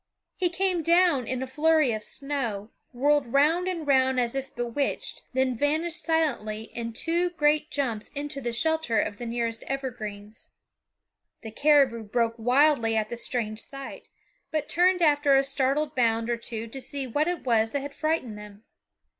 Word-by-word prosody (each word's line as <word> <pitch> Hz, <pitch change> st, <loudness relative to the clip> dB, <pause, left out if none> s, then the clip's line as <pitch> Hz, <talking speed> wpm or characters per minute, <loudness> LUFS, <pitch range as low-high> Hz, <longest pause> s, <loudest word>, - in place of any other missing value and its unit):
He 360 Hz, -2 st, +1 dB
came 360 Hz, 0 st, 0 dB
down 335 Hz, -6 st, +3 dB
in 255 Hz, 0 st, -2 dB
a -, -, -2 dB
flurry 305 Hz, +1 st, +2 dB
of 215 Hz, -, -3 dB
snow, 235 Hz, -8 st, -4 dB, 0.2 s
whirled 280 Hz, 0 st, +1 dB
round 315 Hz, +7 st, +3 dB
and 345 Hz, -4 st, -3 dB
round 265 Hz, -2 st, +3 dB
as 240 Hz, -1 st, 0 dB
if 270 Hz, 0 st, -5 dB
bewitched, 240 Hz, +3 st, -2 dB
then 260 Hz, -1 st, +1 dB
vanished 315 Hz, +6 st, 0 dB
silently 275 Hz, -10 st, -1 dB
in 230 Hz, -1 st, -4 dB
two 340 Hz, +8 st, +1 dB
great 305 Hz, -2 st, +1 dB
jumps 235 Hz, -8 st, -2 dB
into 285 Hz, -1 st, -5 dB
the 240 Hz, -2 st, -2 dB
shelter 320 Hz, -1 st, +1 dB
of 205 Hz, -, -2 dB
the 240 Hz, -, -5 dB
nearest 230 Hz, -1 st, -2 dB
evergreens. 220 Hz, -6 st, -6 dB, 0.9 s
The 220 Hz, -, -7 dB
caribou 275 Hz, -2 st, +3 dB
broke 230 Hz, +2 st, 0 dB
wildly 245 Hz, -1 st, +3 dB
at 215 Hz, -1 st, 0 dB
the -, -, -4 dB
strange 230 Hz, -2 st, -3 dB
sight, 275 Hz, -1 st, -9 dB, 0.4 s
but 310 Hz, -2 st, -2 dB
turned 360 Hz, 0 st, +3 dB
after 290 Hz, -2 st, +4 dB
a 270 Hz, -, +4 dB
startled 275 Hz, +2 st, 0 dB
bound 230 Hz, -2 st, +1 dB
or 235 Hz, -, 0 dB
two 230 Hz, -1 st, -5 dB
to 265 Hz, +4 st, -8 dB
see 275 Hz, +1 st, -4 dB
what 290 Hz, +6 st, 0 dB
it 350 Hz, -1 st, -2 dB
was 225 Hz, -3 st, +2 dB
that 285 Hz, +4 st, -2 dB
had 285 Hz, +1 st, -7 dB
frightened 310 Hz, -10 st, -2 dB
them. 210 Hz, 0 st, -12 dB
270 Hz, 170 wpm, -26 LUFS, 230-305 Hz, 0.9 s, after